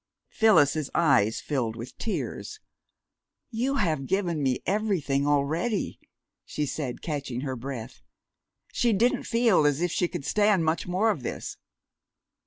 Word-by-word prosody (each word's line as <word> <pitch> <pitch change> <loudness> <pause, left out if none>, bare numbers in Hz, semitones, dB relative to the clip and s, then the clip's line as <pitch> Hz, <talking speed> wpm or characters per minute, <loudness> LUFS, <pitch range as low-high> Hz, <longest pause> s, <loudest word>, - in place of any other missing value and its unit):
'" - - -55
Phyllis's 155 -9 +4
eyes 130 -10 +3
filled 120 -6 -2
with 120 +2 -8
tears. 425 - -4 0.9
"You 250 +4 0
have 155 - 0
given 180 -5 0
me 130 -2 0
everything 175 -9 0
already," 155 +9 0 0.4
she 150 - -3
said, 135 -3 -4
catching 140 -6 -3
her 135 -2 -3
breath. 125 -1 -7 0.7
She 235 -2 +2
didn't 230 +5 +2
feel 230 -8 +3
as 145 0 +1
if 175 0 0
she 175 - +1
could 170 -5 -6
stand 205 -5 +3
much 160 +2 0
more 195 +5 +2
of 155 - -4
this. - - -5
160 Hz, 140 wpm, -27 LUFS, 135-205 Hz, 0.9 s, Phyllis's